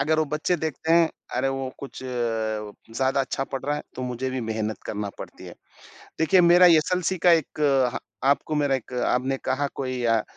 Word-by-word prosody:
अगर 155 Hz, +3 st, +2 dB
वो 155 Hz, -, +3 dB
बच्चे 155 Hz, +4 st, -1 dB
देखते 160 Hz, 0 st, -2 dB
हैं 165 Hz, -1 st, +5 dB, 0.3 s
अरे, 135 Hz, -, +1 dB
वो 135 Hz, -1 st, -2 dB
कुछ 140 Hz, -, -9 dB
ज़्यादा 115 Hz, +1 st, -2 dB
अच्छा 135 Hz, 0 st, -2 dB
पढ़ 135 Hz, -1 st, -5 dB
रहा 145 Hz, +1 st, 0 dB
है, -, -, -5 dB
तो 130 Hz, -, -5 dB
मुझे 125 Hz, +1 st, -3 dB
भी 130 Hz, 0 st, -3 dB
मेहनत 110 Hz, -1 st, -3 dB
करना 105 Hz, -1 st, -3 dB
पड़ती -, -, -9 dB
है। -, -, -10 dB, 0.6 s
देखिए 160 Hz, +4 st, +4 dB
मेरा 175 Hz, +1 st, +7 dB
एसएलसी 180 Hz, +2 st, +3 dB
का -, -, +9 dB
ह 170 Hz, -, +8 dB
एक 135 Hz, -5 st, +1 dB, 0.3 s
आपको 140 Hz, +3 st, +2 dB
मेरा 145 Hz, -2 st, +2 dB
एक 130 Hz, -1 st, -5 dB
आपने 125 Hz, +2 st, 0 dB
कहा 145 Hz, +2 st, 0 dB
कोई 130 Hz, -2 st, -3 dB
अ, 115 Hz, -2 st, +3 dB
135 Hz, 190 wpm, -25 LUFS, 125-155 Hz, 0.6 s, का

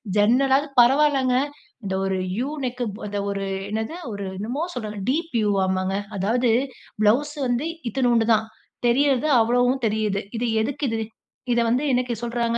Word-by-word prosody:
ஜன்னலாவது 265 Hz, +7 st, +3 dB
பரவால்லங்க. 265 Hz, 0 st, +4 dB, 0.5 s
இந்த 190 Hz, -, -2 dB
ஒரு 190 Hz, 0 st, 0 dB, 0.2 s
'யூ' 265 Hz, +4 st, -1 dB
நெக்" 245 Hz, 0 st, -3 dB
ப 215 Hz, -, -7 dB
இந்த 205 Hz, 0 st, -2 dB
ஒரு 200 Hz, 0 st, -2 dB, 0.2 s
என்னது 220 Hz, +8 st, -3 dB, 0.2 s
ஒரு 200 Hz, -1 st, -5 dB
என்னமோ 245 Hz, +10 st, -3 dB
சொல்றாங்க 215 Hz, -4 st, -5 dB
டீப் 325 Hz, +5 st, -1 dB
யூ 210 Hz, -, +1 dB
வாமாங்க. 190 Hz, 0 st, 0 dB, 0.2 s
அதாவது 230 Hz, +5 st, +1 dB, 0.5 s
ப்ளவுஸ் 280 Hz, +8 st, +2 dB
வந்து 245 Hz, +5 st, 0 dB, 0.2 s
இத்துணூண்டு 240 Hz, -2 st, +2 dB
தான். 220 Hz, 0 st, +1 dB, 0.4 s
தெரியறது 275 Hz, +2 st, +2 dB
அவ்வளவும் 245 Hz, +3 st, +2 dB
தெரியுது. 210 Hz, -2 st, 0 dB, 0.2 s
இது 245 Hz, -, -1 dB, 0.2 s
எதுக்கு 280 Hz, +4 st, -2 dB
இது? 225 Hz, -, -1 dB, 0.5 s
இத 235 Hz, 0 st, +3 dB
வந்து 245 Hz, +5 st, +1 dB
இன்னைக்கி 250 Hz, -1 st, +1 dB
சொல்றாங்க. 235 Hz, -1 st, -1 dB
240 Hz, 150 wpm, -23 LUFS, 215-260 Hz, 0.5 s, பரவால்லங்க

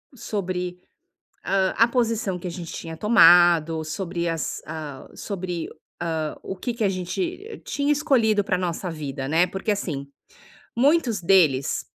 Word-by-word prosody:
sobre, 180 Hz, -5 st, -4 dB, 0.7 s
ah, 190 Hz, -1 st, +1 dB
a 230 Hz, +1 st, +5 dB
posição 225 Hz, -6 st, 0 dB
que 180 Hz, -, -8 dB
a -, -, -3 dB
gente 170 Hz, -1 st, -7 dB
tinha 165 Hz, -1 st, -7 dB
tomado, 175 Hz, -7 st, +5 dB
sobre 170 Hz, +1 st, -3 dB
as 165 Hz, -1 st, -3 dB
ah, 155 Hz, -3 st, -7 dB
sobre, 180 Hz, -4 st, -4 dB, 0.3 s
ah, 160 Hz, -3 st, -2 dB
o 190 Hz, -, -6 dB
que 240 Hz, +5 st, -3 dB
que 230 Hz, -2 st, -1 dB
a -, -, +4 dB
gente 355 Hz, -, -4 dB
tinha 285 Hz, +1 st, 0 dB
escolhido 235 Hz, -9 st, +2 dB
pra 185 Hz, -1 st, 0 dB
nossa 180 Hz, 0 st, -3 dB
vida, 140 Hz, -4 st, -5 dB
né. 165 Hz, +4 st, +3 dB
Porque, 190 Hz, +4 st, -3 dB
assim, 150 Hz, -9 st, -4 dB, 0.7 s
muitos 260 Hz, -, +2 dB
deles 165 Hz, -7 st, +3 dB
180 Hz, 145 wpm, -24 LUFS, 165-220 Hz, 0.7 s, a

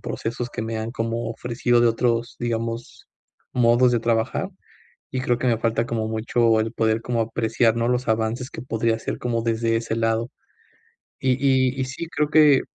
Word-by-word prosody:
procesos 120 Hz, +2 st, -4 dB
que 110 Hz, -, -4 dB
me 110 Hz, 0 st, -3 dB
han 110 Hz, +1 st, -3 dB
como 115 Hz, 0 st, -2 dB
ofrecido 120 Hz, +1 st, +1 dB
de 120 Hz, -, +5 dB
otros, 115 Hz, 0 st, 0 dB
digamos, 115 Hz, 0 st, -4 dB, 0.5 s
modos 120 Hz, +1 st, +4 dB
de 120 Hz, -, +3 dB
trabajar. 115 Hz, -1 st, 0 dB, 0.6 s
Y 130 Hz, -, -2 dB
creo 125 Hz, -2 st, +1 dB
que 130 Hz, -, -2 dB
me 115 Hz, -3 st, +2 dB
falta 115 Hz, +1 st, 0 dB
como 110 Hz, -2 st, -2 dB
mucho 110 Hz, +1 st, +2 dB
el 110 Hz, +1 st, -2 dB
poder 110 Hz, -1 st, +1 dB
como 120 Hz, 0 st, -1 dB
apreciar, 115 Hz, 0 st, +1 dB
¿no?, 115 Hz, 0 st, +1 dB
los 125 Hz, +1 st, 0 dB
avances 110 Hz, +3 st, -1 dB
que -, -, -7 dB
podría 115 Hz, -2 st, 0 dB
hacer 115 Hz, -, -5 dB
como 115 Hz, -2 st, -1 dB
desde 115 Hz, 0 st, +1 dB
ese 115 Hz, 0 st, -2 dB
lado. 115 Hz, +1 st, 0 dB, 0.9 s
Y 130 Hz, -, +1 dB
y 130 Hz, -1 st, +2 dB
y 130 Hz, -, 0 dB
sí, 135 Hz, +6 st, -6 dB
creo 150 Hz, -2 st, 0 dB
que, 150 Hz, -3 st, +6 dB
115 Hz, 185 wpm, -23 LUFS, 115-125 Hz, 0.9 s, que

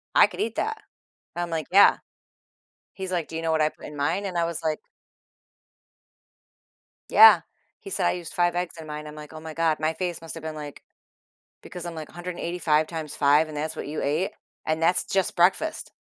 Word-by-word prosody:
"I -, -, +8 dB
could -, -, -11 dB
eat 225 Hz, +1 st, -2 dB
that." 440 Hz, +1 st, -2 dB, 0.6 s
I'm 175 Hz, 0 st, -2 dB
like, 160 Hz, -3 st, -3 dB
"Yeah." 200 Hz, +2 st, +7 dB, 1.0 s
He's 190 Hz, -1 st, -5 dB
like, 175 Hz, -4 st, -1 dB
"Do 165 Hz, -, -8 dB
you 165 Hz, -, -2 dB
know 165 Hz, -1 st, 0 dB
what 160 Hz, -, +2 dB
I 155 Hz, -, +3 dB
put -, -, -14 dB
in 150 Hz, -, -9 dB
mine?" 165 Hz, +8 st, 0 dB
And 185 Hz, -3 st, -3 dB
I 170 Hz, -, +2 dB
was 170 Hz, 0 st, -4 dB
like 155 Hz, -1 st, 0 dB, 2.3 s
Yeah. 445 Hz, -, +9 dB, 0.4 s
He 395 Hz, -, -10 dB
said, -, -, 0 dB
"I -, -, +4 dB
used 175 Hz, -2 st, -6 dB
5 175 Hz, 0 st, +2 dB
eggs 175 Hz, -1 st, -3 dB
in 160 Hz, -1 st, -9 dB
mine." 150 Hz, 0 st, -6 dB
I'm 150 Hz, -, -9 dB
like, 150 Hz, 0 st, -10 dB
"Oh, 155 Hz, -, -8 dB
my 160 Hz, -1 st, -7 dB
god." 165 Hz, -1 st, +1 dB
My 155 Hz, +1 st, 0 dB
face 175 Hz, 0 st, -3 dB
must've 165 Hz, 0 st, -7 dB
been 160 Hz, 0 st, -5 dB
like 150 Hz, -1 st, -8 dB, 0.8 s
because 180 Hz, -3 st, -8 dB
I'm 170 Hz, -1 st, -6 dB
like, 155 Hz, -1 st, -7 dB
"185 170 Hz, -3 st, -1 dB
times 160 Hz, -3 st, -5 dB
5 145 Hz, +2 st, +4 dB
and 155 Hz, -, -9 dB
that's 155 Hz, +2 st, -3 dB
what -, -, -6 dB
you 155 Hz, -, -4 dB
ate?" 155 Hz, +7 st, 0 dB, 0.3 s
And 155 Hz, +1 st, -1 dB
that's 175 Hz, +2 st, +3 dB
just 190 Hz, -1 st, 0 dB
breakfast. 190 Hz, -, +1 dB
165 Hz, 205 wpm, -25 LUFS, 155-175 Hz, 2.3 s, Yeah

